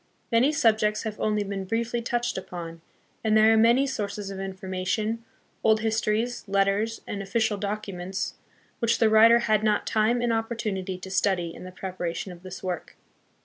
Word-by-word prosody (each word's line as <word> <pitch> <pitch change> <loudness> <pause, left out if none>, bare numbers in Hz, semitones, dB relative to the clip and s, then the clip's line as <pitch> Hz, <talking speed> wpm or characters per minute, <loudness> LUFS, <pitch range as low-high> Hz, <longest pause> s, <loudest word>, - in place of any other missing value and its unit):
Many 240 +5 +4
subjects 215 -6 +2
have 220 -2 -5
only 210 -1 +1
been 195 -1 -4
briefly 235 +3 -1
touched 240 0 -1
upon, 170 -3 -7 0.4
and 220 -1 +3
there 220 +1 +6
are - - +5
many 235 +5 +5
sources 205 -6 -4
of 195 - -6
information, 190 +4 -2 0.4
old 220 -1 +4
histories, 220 +2 0
letters 200 +3 +1
and 200 - -4
official 215 +1 0
documents, 195 -2 -3 0.5
which 230 -1 +2
the 225 -2 +3
writer 225 +2 +7
had 215 -3 +2
not 210 -1 +2
time 220 +3 +2
and 240 -1 +1
opportunity 215 -5 -2
to 190 +1 -9
study 185 -3 +1
hi - - -11
the 185 - -8
preparation 180 0 -4
of 175 -1 -12
this 185 0 -9
work. 180 -3 -4
215 Hz, 165 wpm, -26 LUFS, 190-225 Hz, 0.5 s, writer